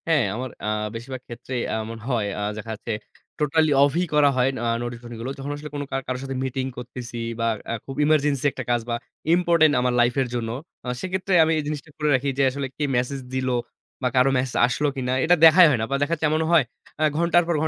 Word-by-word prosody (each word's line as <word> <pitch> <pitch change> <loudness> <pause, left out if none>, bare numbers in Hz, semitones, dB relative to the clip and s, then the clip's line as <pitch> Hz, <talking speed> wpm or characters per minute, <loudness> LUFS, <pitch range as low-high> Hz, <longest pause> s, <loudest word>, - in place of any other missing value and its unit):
হ্যাঁ, 160 -5 +3
আমার 130 +2 -4
আ - - -2 0.3
বেশিরভাগ 125 +2 -6
ক্ষেত্রেই 120 +1 -5 0.2
এমন 115 +1 -6
হয় 115 -5 0
আ - - -2 0.2
দেখা 110 +1 -6
হচ্ছে 115 - -6 0.5
টোটালি 155 +1 +2
অফ 140 - +4
ই - - +2
করা 150 -1 +5
হয় 125 +1 +3 0.2
আ - - +1 0.2
নোটিফিকেশন 120 0 -7
গুলো। 130 +3 -3
যখন 140 +2 -4
আসলে 150 +1 -8
কোনো 145 0 -3
কার 135 - -1
কারো 130 0 -2
সাথে 135 -1 -4
মিটিং 130 0 -2
করতেছি 125 -1 -7 0.2
বা 115 - 0 0.3
আ - - 0
খুব 135 - -7
এমার্জেন্সি 145 -3 +2
একটা 130 - -6
কাজ 120 -1 +2
বা 120 - 0 0.4
ইম্পোর্টেন্ট 170 -4 +4
আমার 125 0 +1
লাইফ 120 0 +4
এর 130 - 0
জন্য। 115 -2 -2 0.4
আ - - -7
সেক্ষেত্রে 190 +1 -2
আমি 160 - +1
এই - - -2
জিনিসটা 150 0 -5
করে 150 -1 0
রাখি 135 +2 0
যে - - +4
আসলে 140 +1 -3
কে 150 - -2
মেসেজ 125 +3 -1
দিল 130 0 -1 0.5
বা 130 - +1
কারো 130 +1 +5
মেসেজ 125 -1 -2
আসলো 135 +4 0
কিনা? 125 -2 -2
এটা 175 +2 +5
দেখাই 170 +3 +9
হয় 130 -6 +1
না। - - 0
বা - - +2
দেখা 145 - 0
যাচ্ছে 160 -1 -1
এমনও 155 +1 +1
হয় 165 -4 +6 0.4
আ - - +3
ঘন্টার 170 +1 +4
পর 170 - +1
135 Hz, 225 wpm, -24 LUFS, 125-150 Hz, 0.5 s, দেখাই